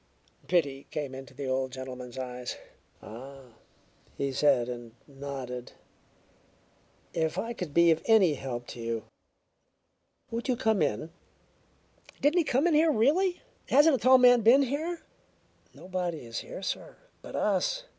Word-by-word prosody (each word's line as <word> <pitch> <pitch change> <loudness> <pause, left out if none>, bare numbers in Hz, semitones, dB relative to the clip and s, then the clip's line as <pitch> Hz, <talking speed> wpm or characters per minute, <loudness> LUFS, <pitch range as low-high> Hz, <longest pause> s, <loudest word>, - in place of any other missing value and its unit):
Pity 140 -6 0
came 145 -3 -4
into 135 0 -10
the 140 +1 -5
old 130 0 -1
gentleman's 125 -1 -8
eyes. 125 -1 -5 0.5
"Ah," 130 +2 -11 0.6
he 140 0 -1
said, 135 -3 +3
and 120 -2 -7
nodded. 135 -3 -7 1.4
"If 160 -1 -1
I 235 +1 -2
could 180 -9 -6
be 170 +2 +5
of 160 - +1
any 210 -8 +5
help 125 -3 -5
to 120 - -8
you 115 -1 -3 1.3
Would 230 +3 -3
you 255 - +2
come 220 -6 +1
in?" 150 +3 -1 1.1
"Didn't 300 +5 +3
he - - +3
come 275 +1 +1
in 350 - +3
here, 315 +1 +5
really? 320 - +2 0.3
Hasn't 295 +3 +6
a - - -2
tall 255 +4 +7
man 245 -1 +6
been 245 +6 +6
here?" 315 +6 -3 0.7
"Nobody 180 -6 -4
is 115 0 -5
here, 195 - -8
sir, - - -4 0.3
but - - -9
us. - - 0
155 Hz, 145 wpm, -29 LUFS, -, 1.4 s, tall